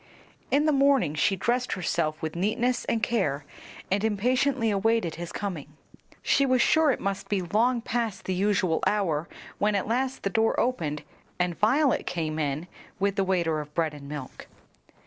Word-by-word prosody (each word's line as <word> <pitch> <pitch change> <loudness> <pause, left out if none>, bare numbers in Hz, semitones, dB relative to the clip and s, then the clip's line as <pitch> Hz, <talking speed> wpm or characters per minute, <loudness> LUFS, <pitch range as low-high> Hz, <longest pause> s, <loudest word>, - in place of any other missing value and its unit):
In 290 +2 +3
the 310 - +4
morning 275 - +3
she 155 +6 +2
dressed 245 +6 0
herself 160 -4 -1
with 160 0 -3
neatness 235 +7 0
and 225 -2 -1
care 150 -12 0 0.5
and 200 +2 +1
impatiently 240 +3 +1
awaited 205 -3 +1
his 170 0 -6
coming. 155 -7 -5 0.5
She 275 - +3
was 255 -2 +3
sure 315 +5 +4
it 265 - +1
must 195 0 -3
be 195 -3 0
long 230 +7 +1
past 230 -3 -2
the 190 - -1
usual 185 -3 +1
hour 170 -7 0 0.3
when 210 0 +2
at 200 - 0
last 260 +3 -1
the 195 - -1
door 225 +1 +2
opened 155 - -1 0.3
and 180 -1 0
Violet 260 - +2
came 160 -3 -2
in 150 +3 -2 0.3
with 200 0 +1
the 195 - +2
waiter 170 -4 +1
of 150 0 -9
bread 160 -3 0
and 140 -1 -10
milk. 145 -3 -8
200 Hz, 170 wpm, -27 LUFS, 165-235 Hz, 0.5 s, the